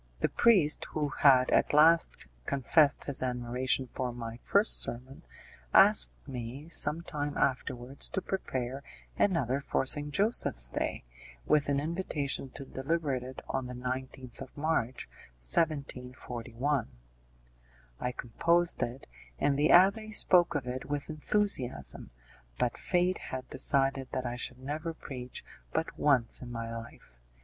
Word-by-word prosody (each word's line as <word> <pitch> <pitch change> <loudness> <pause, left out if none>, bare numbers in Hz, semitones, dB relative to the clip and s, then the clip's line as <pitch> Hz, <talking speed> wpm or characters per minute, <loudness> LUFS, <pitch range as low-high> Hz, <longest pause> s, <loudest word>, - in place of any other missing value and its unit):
The - - +2
priest, 185 -11 +3
who 150 -2 -1
had 130 -3 +4
at - - +2
last 160 - +4 0.2
confessed 140 +2 +2
his 140 -2 +1
admiration 125 +1 -1
for 125 0 -4
my 115 -1 -7
first 205 +3 +4
sermon, 125 +3 -3 0.5
asked - - +7 0.2
me, 130 +4 -7
some 165 0 +6
time 145 -3 -4
afterwards, 130 0 -2
to - - -2
prepare 130 -8 -4 0.4
another 140 - +1
for 140 - -1
St. 145 +2 +3
Joseph's 190 - +1
Day, - - -3 0.4
with 150 -1 +2
an 140 -1 +1
invitation 150 -4 -3
to 140 - -8
deliver 145 +3 -2
it 130 0 -6
on 130 -1 -3
the 125 - -7
19th 130 0 -6
of 135 +1 -10
March, 145 -5 -1 0.3
1741. 125 - -2 1.1
I 125 - -2
composed 170 +9 0
it, 120 +3 -4 0.3
and 140 - +1
the 145 +2 +2
abbé 200 +5 +5
spoke 175 -5 +4
of 140 -4 -2
it 125 +1 -5
with 145 +1 -4
enthusiasm, 150 - 0 0.5
but 120 - 0
fate 180 0 0
had 130 0 -7
decided 135 0 +1
that 130 -1 -2
I 120 0 -3
should 125 +1 -4
never 155 +5 -5
preach 125 -5 -8 0.3
but - - -3
once 130 -6 +2
in 125 -1 -8
my 115 -1 -5
life. 115 - -11
135 Hz, 135 wpm, -30 LUFS, 125-150 Hz, 1.1 s, asked